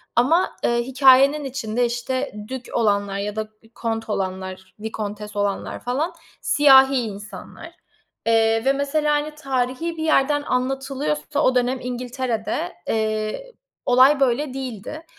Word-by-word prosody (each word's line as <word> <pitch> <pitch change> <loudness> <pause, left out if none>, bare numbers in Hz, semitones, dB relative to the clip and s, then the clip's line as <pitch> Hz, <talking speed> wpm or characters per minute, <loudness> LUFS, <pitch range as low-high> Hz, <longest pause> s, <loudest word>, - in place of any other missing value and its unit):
ama, 315 +10 +3
eee, 235 0 +1
hikâyenin 270 +3 +5
içinde, 245 -3 -1
işte, 245 +3 -2 0.2
dük 260 -2 -6
olanlar 200 -3 +1
ya 205 +1 -3
da 220 0 -2
k - - -40 0.2
kont 225 -1 -3
olanlar, 190 -1 -4
vikontes 210 -1 -6
olanlar, 205 -1 -2
falan, 275 +8 -2 0.3
siyahi 270 -2 +6
insanlar, 210 -4 -7 0.6
eee, 225 0 +3
ve 270 - +4
mesela, 295 +2 0
hani, 300 +1 -2
tarihî 275 +3 -2
bir 315 - -3
yerden 290 -2 +2
anlatılıyorsa 255 - -2
o 255 - +3
dönem 250 +1 +1
İngiltere'de, 245 -5 -3
eee, 220 - -2 0.3
olay 260 +3 +5
böyle 270 +1 +1
değildi. 265 +4 -6
250 Hz, 125 wpm, -22 LUFS, 215-270 Hz, 0.6 s, siyahi